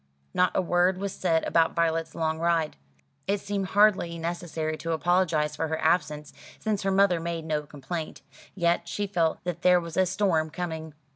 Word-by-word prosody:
Not 180 0 +3
a 190 - +2
word 175 +1 +2
was 195 0 -3
said 165 -3 +1
about 165 -1 +2
Violet's 165 -1 0
long 160 -1 -1
ride. 165 -2 +1 0.5
It 200 +1 +1
seemed 200 -1 -3
hardly 195 -4 +3
necessary 165 -2 -3
to 165 +1 -3
apologise 160 -3 +1
for 160 +1 -2
her 160 0 -2
absence, 150 -3 0 0.2
since 215 -2 -1
her 195 - 0
mother 190 -2 +3
made 165 -1 -4
no 155 -2 0
complaint. 150 +1 -6 0.3
Yet 170 -2 +1
she 205 +4 -2
felt 170 -5 0
that 175 -1 -4
there 180 0 +5
was 170 -1 -7
a 185 -1 +4
storm 175 -4 +1
coming. 160 -2 -5
170 Hz, 180 wpm, -27 LUFS, 160-185 Hz, 0.5 s, there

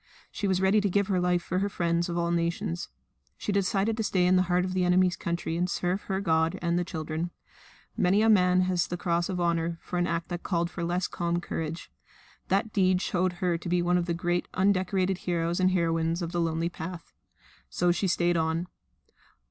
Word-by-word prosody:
She 205 - -2
was 190 -1 +1
ready 195 +2 +4
to 200 - +1
give 200 +2 +1
her 185 -2 +2
life 180 -1 +1
for 185 - -1
her 200 +1 0
friends 170 -2 0
of 170 - -2
all 170 0 0
nations. 170 - -2 0.5
She - - -3
decided 200 +2 +1
to 220 - 0
stay 185 -3 +2
in 180 +1 +4
the 185 - +5
heart 180 +1 +2
of 185 - -3
the 185 -1 +1
enemies' 180 0 +3
country 170 -2 -3
and 175 +2 0
serve 180 +3 -1
her 190 -1 -1
God 160 -1 +1
and 170 0 0
the - - 0
children. 160 0 -4 0.7
Many 195 +4 +3
a - - +4
man 185 -4 +5
has 180 -1 +1
had - - -14
the 175 - -3
cross 170 0 0
of 185 -2 -2
Honour 170 -1 0
for 180 - -3
an 175 - +1
act 170 0 -2
that 175 -1 -4
called 170 -1 -1
for 175 - -5
less 175 +2 0
calm 170 0 -1
courage. 165 -1 -5 0.6
That 200 +3 0
deed 185 -2 +3
showed 185 -1 0
her 175 -1 -1
to 175 - -6
be 175 0 +2
one 180 +1 +2
of 175 - -3
the 170 - 0
great 175 +1 -1
undecorated 190 -1 +1
heroes 170 0 -1
and 185 0 +4
heroines 165 -1 0
of 165 - -4
the 175 -1 0
lonely 165 0 0
path. 170 0 -8 0.6
So 175 0 +1
she 190 +3 0
stayed 175 -1 +2
on. 160 +1 0
175 Hz, 220 wpm, -28 LUFS, 170-185 Hz, 0.7 s, the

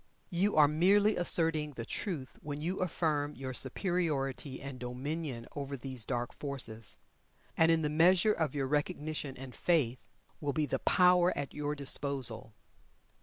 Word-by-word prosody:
You 190 +4 +1
are 150 -1 +7
merely 200 +7 +3
asserting 160 -3 +4
the 115 -3 -6
Truth 155 - -5
when 145 -1 -5
you 175 +5 -3
affirm 155 -5 -1
your 130 -1 -6
superiority 135 -3 0
and 135 -2 -8
dominion 125 +1 -5
over 140 -1 -4
these 130 -3 -2
dark 120 -2 -3
forces. 120 -6 -2 0.6
And 165 0 +4
in 165 -1 +2
the - - +1
measure 180 +6 +4
of 155 -6 -2
your 140 -2 0
Recognition 150 -1 -2
and 130 -1 -9
Faith, 135 -8 +1 0.4
will 145 -2 -2
be 155 +1 0
the - - -2
power 180 0 +4
at 140 - -4
your 150 0 -3
disposal. 135 -5 -2
145 Hz, 150 wpm, -32 LUFS, 135-165 Hz, 0.6 s, are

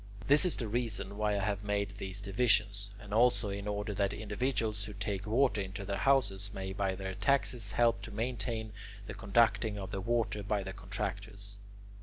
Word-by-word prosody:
This 145 +5 +6
is 180 - +3
the 115 - -3
reason 115 -2 -1
why 105 0 +1
I 100 - -1
have 100 0 -1
made 100 -1 -1
these 95 0 -3
divisions, 100 -1 +2
and 105 -1 -9
also 120 -1 +4
in 100 +1 -4
order 105 0 -2
that 100 0 0
individuals 110 0 -1
who 105 - -7
take 100 0 -3
water 120 -1 +3
into 100 +1 -5
their 100 +1 -1
houses 100 -8 +2
may 95 0 -4
by 95 -1 0
their 95 0 -4
taxes 125 -3 +1
help 115 -1 +3
to - - -8
maintain 110 -1 -2 0.3
the 105 - -6
conducting 110 +1 +2
of 95 -2 -5
the 95 - -2
water 115 0 0
by 100 0 -1
the 95 0 -5
contractors. 100 +1 -4
105 Hz, 185 wpm, -32 LUFS, 100-115 Hz, 0.3 s, This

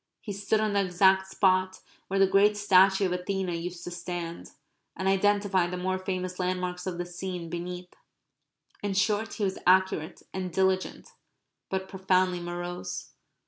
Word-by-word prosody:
He 205 - -6
stood 200 +2 0
on 215 -1 0
the 200 -1 +3
exact 190 +1 +3
spot 185 -1 +2 0.3
where 195 - -1
the 195 - +7
great 200 +2 +4
statue 195 -1 +5
of 185 - 0
Athena 180 0 -2
used 170 +1 -5
to 175 - -6
stand, 175 -1 -5 0.5
and 190 - -2
identified 195 -2 +2
the 180 - -4
more 185 +1 -1
famous 185 -1 -4
landmarks 180 0 -2
of 180 -2 -3
the 175 - -3
scene 175 -1 -6
beneath. 180 +1 -6 0.9
In 205 -1 -2
short 210 +3 +1
he 210 - -3
was 190 -1 -1
accurate 185 -3 +2
and 185 -1 -3
diligent; 190 +1 0 0.6
but 190 0 -2
profoundly 185 -1 +1
morose. 175 +1 -5
185 Hz, 155 wpm, -28 LUFS, 180-195 Hz, 0.9 s, the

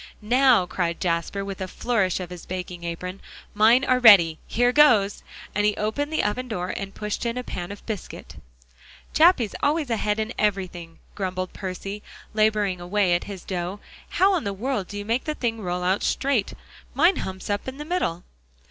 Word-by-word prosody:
"Now," 245 -2 +4
cried 175 -1 -2
Jasper, 175 +3 -1
with 195 -1 -6
a 190 - -2
flourish 195 -3 0
of 180 -1 -6
his 180 -1 -9
baking 180 -1 -6
apron, 180 +3 -5 0.3
"mine 230 +5 +5
are 255 0 +3
ready. 185 -9 +7
Here 245 +2 +2
goes!" 240 -9 +4 0.3
and 205 - +1
he 210 0 +2
opened 285 +8 -2
the 315 - 0
oven 250 +5 -1
door 185 -6 -3
and 195 0 -6
pushed 210 -1 -4
in 235 0 -2
a 250 - -3
pan 175 -5 -6
of 205 - -10
biscuit. 215 -4 -7 0.8
"Jappy's 310 - +4
always 295 -3 +1
ahead 215 -1 0
in 220 +2 -2
everything," 185 -5 -2 0.2
grumbled 185 -2 -3
Percy, 195 +2 -6 0.3
laboring 210 -4 +1
away 185 0 +1
at 175 - 0
his 195 -3 -8
dough. 180 +1 -4 0.3
"How 390 +1 +3
in - - -4
the 200 -1 -2
world 210 -1 -2
do 205 - -7
you 205 - -5
make 230 +4 -1
the 305 -1 -2
thing 225 -4 -2
roll 180 -1 -3
out 185 +2 +1
straight? 265 -7 0 0.4
Mine 340 +8 +4
humps 190 0 -5
up 205 +3 -2
in 260 +1 -5
the 295 - -6
middle." 310 - -1
205 Hz, 185 wpm, -24 LUFS, 185-245 Hz, 0.8 s, ready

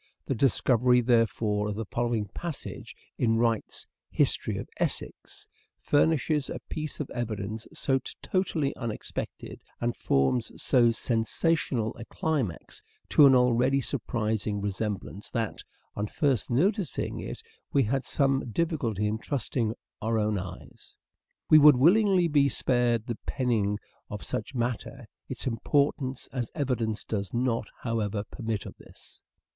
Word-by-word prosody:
The - - 0
discovery, 125 0 +3
therefore, 115 -3 +2
of 105 - -3
the 110 +1 -3
following 120 0 -1
passage 170 -5 -6 0.2
in 115 -2 +3
Wright's 115 -2 0 0.2
" - - -65
History - - +1
of - - -5
Essex - - -4 0.2
" - - -50
furnishes 150 -1 +3
a - - -4
piece 155 -1 -4
of 150 - -2
evidence 110 -2 -4
so 135 -1 +1 0.2
totally 165 -7 0
un 115 -2 -3
expected, 105 - -6 0.2
and 120 0 -1
forms 70 - +1
so 120 -3 +4
sensational 115 +1 0
a 115 - -7
climax 135 - -3 0.3
to 145 - +7
an 135 - +6
already 125 +2 +3
surprising 110 -5 -2
resemblance 100 0 -4
that, 115 -2 -2 0.3
on 105 +1 -2
first 135 - 0
noticing 185 - 0
it, - - -6 0.3
we 140 - +4
had 130 +4 0
some 135 -3 +1
difficulty 120 - 0
in 105 +1 -1
trusting 115 -3 -2 0.3
our 115 +1 0
own 105 -2 +1
eyes. 90 -1 -10 0.5
We 155 - +8
would 150 -3 +8
willingly 185 - +5
be 145 -3 +4
spared 120 -3 +1
the 120 -3 -4
penning 110 -6 +1 0.3
of 105 -1 -6
such 110 +5 -4
matter: 120 -2 -3 0.2
its - - -5
importance 130 +2 0
as 125 -4 -2
evidence 120 -7 -1
does 100 -1 -3
not, 120 -3 0 0.2
however, 110 -3 -1
permit 110 -2 -4
of - - -8
this. - - -18
120 Hz, 140 wpm, -28 LUFS, 110-140 Hz, 0.5 s, We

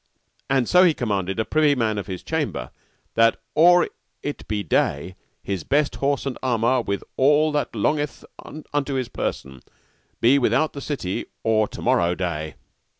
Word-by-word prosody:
And 130 -3 +2
so 180 +1 +6
he 170 -4 +4
commanded 100 -4 -2
a 110 - +1
privy 150 -2 +3
man 110 -4 0
of 100 - -6
his 95 -2 -6
chamber - - -3 0.4
that 115 0 +3
or 175 +2 +6 0.4
it 145 - -5
be 105 -1 -2
day 85 +1 0 0.3
his 95 -5 -3
best 145 - +1
horse 140 0 0
and 135 -3 -4
armour, 125 0 +2
with 100 -3 -3
all 150 +3 +4
that 145 -5 -2
longeth 145 +7 -1 0.5
unto 145 -1 -1
his 130 -3 -2
person, 65 -2 -4 0.6
be 130 +4 +5
without 155 +4 +1
the 140 - -7
city 115 -12 -3 0.2
or 110 -1 +2
to - - -9
morrow 85 0 +2
day. 80 -5 -3
120 Hz, 160 wpm, -23 LUFS, 100-145 Hz, 0.6 s, so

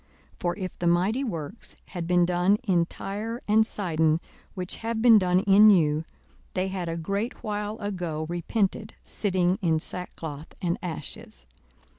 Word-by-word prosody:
for 175 -1 -1
if 185 -2 -5
the 175 - 0
mighty 190 +10 +2
works 185 - -6
had 175 -3 -5
been 175 0 +4
done 180 +3 +3
in 175 -6 +2
Tyre 220 +6 -5
and 220 +1 +4
Sidon, 160 -6 +1 0.4
which 180 -1 -4
have 225 0 -3
been 225 -2 +7
done 180 -1 +2
in 205 +2 +7
you, 160 -5 +3 0.5
they 185 +1 0
had 185 -3 -3
a 165 - -3
great 200 +10 -3
while 210 0 -3
ago 180 -7 -3
repented, 195 +5 -1
sitting 185 -1 0
in 165 -4 +2
sackcloth 160 -3 -7
and 175 +2 -1
ashes. 160 - -5
185 Hz, 150 wpm, -26 LUFS, 170-210 Hz, 0.5 s, been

